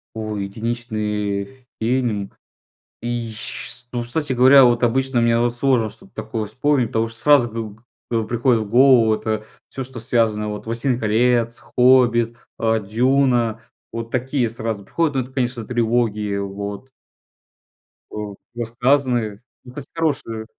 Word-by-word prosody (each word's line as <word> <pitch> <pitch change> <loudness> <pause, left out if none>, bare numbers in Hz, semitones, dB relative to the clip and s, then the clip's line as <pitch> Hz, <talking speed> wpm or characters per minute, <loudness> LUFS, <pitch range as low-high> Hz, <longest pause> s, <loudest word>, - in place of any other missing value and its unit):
Ой, 110 -2 -3
единичный 110 +1 -3
фильм 115 -4 -1 0.7
и 120 -1 -3
ж - - -10
ш 120 +3 -7
ну, 120 -1 -2
кстати 135 +3 -2
говоря, 130 +2 +7
вот 120 0 +2
обычно 130 +1 +1
мне 115 0 +3
вот 120 0 +1
сложно 120 -3 +2
что-то 195 - -17
такое 110 -2 -4
вспомнить, 125 +4 +1
потому 115 +1 0
что 115 0 -11
сразу 140 -2 +5
гыг 110 -1 -7 0.3
э, 115 -1 +1
приходит 120 0 +1
в 105 - -6
голову 120 -2 +6
это 110 0 -3 0.2
всё, 135 - -5
что 130 -2 -9
связано 110 -2 +1
вот: 105 0 -6
"Властелин 120 +2 0
колец", 115 +1 +1 0.2
"Хоббит", 120 -2 +4 0.2
э, 115 0 +2
"Дюна"- 120 0 +2 0.3
вот 115 0 -6
такие 130 0 0
сразу 110 -2 -4
приходят. 160 +2 0
Ну, 130 - +2
это, 130 - -14
конечно, 125 -3 -2
трилогии 110 -3 0
вот. 100 +4 -5 1.2
А, - - -9 0.4
рассказаны. 120 -2 0 0.2
Ну, 125 - -13
кстати, 135 +2 -8
хорошие. 140 -9 -2
120 Hz, 145 wpm, -21 LUFS, 110-125 Hz, 1.2 s, говоря